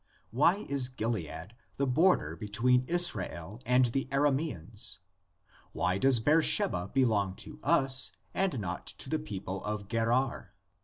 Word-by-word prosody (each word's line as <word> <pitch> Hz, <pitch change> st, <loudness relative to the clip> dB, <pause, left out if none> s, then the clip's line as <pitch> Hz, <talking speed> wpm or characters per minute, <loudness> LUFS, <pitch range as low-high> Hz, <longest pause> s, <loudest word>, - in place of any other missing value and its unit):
Why 170 Hz, -, +2 dB
is 135 Hz, -3 st, +1 dB
Gilead 105 Hz, -, -4 dB, 0.2 s
the 140 Hz, -, +1 dB
border 130 Hz, -, +2 dB
between 115 Hz, +7 st, +1 dB
Israel 105 Hz, -, -1 dB
and 125 Hz, +1 st, +4 dB
the 130 Hz, +3 st, -2 dB
Ara 140 Hz, +1 st, +3 dB
maeans? 110 Hz, -, -4 dB, 0.8 s
Why 90 Hz, +2 st, 0 dB
does 135 Hz, -1 st, +5 dB
Beersheba 110 Hz, -, +3 dB
belong 105 Hz, -8 st, +1 dB
to 150 Hz, -, -11 dB
us 135 Hz, -4 st, +2 dB, 0.2 s
and 190 Hz, -10 st, 0 dB
not 90 Hz, -4 st, -5 dB
to -, -, -2 dB
the -, -, +1 dB
people 95 Hz, +8 st, -6 dB
of 105 Hz, -1 st, -4 dB
Gerar? 115 Hz, +4 st, -1 dB
120 Hz, 135 wpm, -30 LUFS, 100-135 Hz, 0.8 s, does